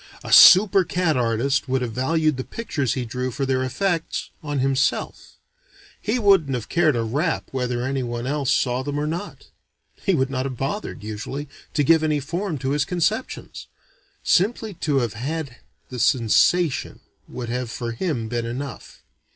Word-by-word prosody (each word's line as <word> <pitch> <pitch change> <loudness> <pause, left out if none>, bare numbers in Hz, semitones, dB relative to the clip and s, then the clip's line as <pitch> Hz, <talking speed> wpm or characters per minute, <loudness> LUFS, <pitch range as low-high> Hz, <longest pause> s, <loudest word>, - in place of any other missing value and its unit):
A - - -2
super 195 0 +8
cat 175 -2 0
artist 125 +3 0
would 130 0 +1
have 120 - -3
valued 155 +4 +1
the 130 - -3
pictures 145 - -3
he 130 -2 -2
drew 125 +2 -3
for 135 +3 -3
their 130 -1 0
effects 165 +6 -2
on 145 -2 -3
himself; 135 0 -1 0.7
he 220 +4 0
wouldn't 195 - +3
have 120 -3 -5
cared 160 -5 +3
a 115 - 0
rap 145 +9 -1
whether 125 -2 -2
anyone 125 -3 -3
else 140 0 -1
saw 125 -2 +1
them 145 +2 -3
or 150 - -1
not. 170 +6 -6 0.5
He 195 - 0
would 135 -2 0
not 130 0 -1
have 130 -2 -6
bothered, 140 - -4
usually, 125 +7 -5 0.3
to 145 - +3
give 160 +3 +5
any 155 -2 +1
form 170 +4 -3
to 130 - 0
his 145 0 +1
conceptions. 185 - -2 0.6
Simply 215 +3 +1
to 150 -4 -1
have 115 -3 -2
had 135 +2 -4 0.3
the 125 - -6
sensation 130 +7 +2 0.3
would 120 -2 -6
have 125 0 -3
for 115 0 -4
him 120 -2 -2
been 120 0 -3
enough. 125 0 -7
135 Hz, 165 wpm, -23 LUFS, 125-160 Hz, 0.7 s, super